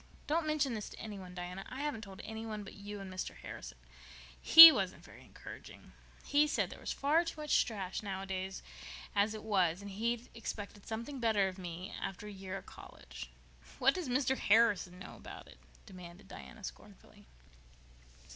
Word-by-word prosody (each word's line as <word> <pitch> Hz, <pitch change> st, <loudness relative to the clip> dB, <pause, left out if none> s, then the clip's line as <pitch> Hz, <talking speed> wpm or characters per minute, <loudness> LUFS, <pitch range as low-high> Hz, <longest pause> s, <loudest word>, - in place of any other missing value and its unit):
Don't 315 Hz, +1 st, 0 dB
mention 295 Hz, -4 st, +1 dB
this 215 Hz, -2 st, -5 dB
to -, -, -12 dB
any 210 Hz, -3 st, -7 dB
one, 180 Hz, -1 st, -10 dB
Diana. 180 Hz, +2 st, -6 dB
I 260 Hz, +2 st, -6 dB
haven't 290 Hz, -7 st, -3 dB
told 195 Hz, -3 st, -10 dB
anybody 220 Hz, -1 st, -6 dB
but 195 Hz, -, -11 dB
you 205 Hz, +1 st, -8 dB
and 190 Hz, -1 st, -8 dB
Mr. 185 Hz, -, -5 dB
Harrison. 60 Hz, 0 st, -9 dB, 0.6 s
He 325 Hz, +1 st, +13 dB
wasn't 195 Hz, -9 st, -2 dB
very -, -, -15 dB
encouraging—he 295 Hz, +1 st, -4 dB
said 300 Hz, -, -1 dB
there -, -, -10 dB
was -, -, -4 dB
far 305 Hz, +4 st, +2 dB
too 330 Hz, -2 st, -6 dB
much 300 Hz, -1 st, +3 dB
trash 195 Hz, -5 st, -5 dB
written 205 Hz, -, -7 dB
nowadays 190 Hz, 0 st, -4 dB, 0.5 s
as 210 Hz, +2 st, +2 dB
it 215 Hz, -, -8 dB
was, 185 Hz, -5 st, +1 dB
and 200 Hz, 0 st, -8 dB
he'd 235 Hz, +4 st, -2 dB
expected 205 Hz, -3 st, -7 dB
something 235 Hz, +5 st, -5 dB
better 220 Hz, -4 st, +2 dB
of 190 Hz, 0 st, -7 dB
me, 180 Hz, +2 st, -7 dB
after 195 Hz, +2 st, -5 dB
a 210 Hz, -, -7 dB
year 190 Hz, -1 st, -6 dB
at -, -, -11 dB
college." -, -, -11 dB, 0.5 s
"What 270 Hz, +2 st, +4 dB
does 355 Hz, -7 st, -4 dB
Mr. 265 Hz, +1 st, +1 dB
Harrison 205 Hz, -4 st, +3 dB
know 185 Hz, -, -10 dB
about -, -, -11 dB
it?" -, -, -16 dB, 0.3 s
demanded 180 Hz, 0 st, -12 dB
Diana 220 Hz, -2 st, -11 dB
scornfully. 200 Hz, -, -11 dB
205 Hz, 175 wpm, -33 LUFS, 190-240 Hz, 0.6 s, He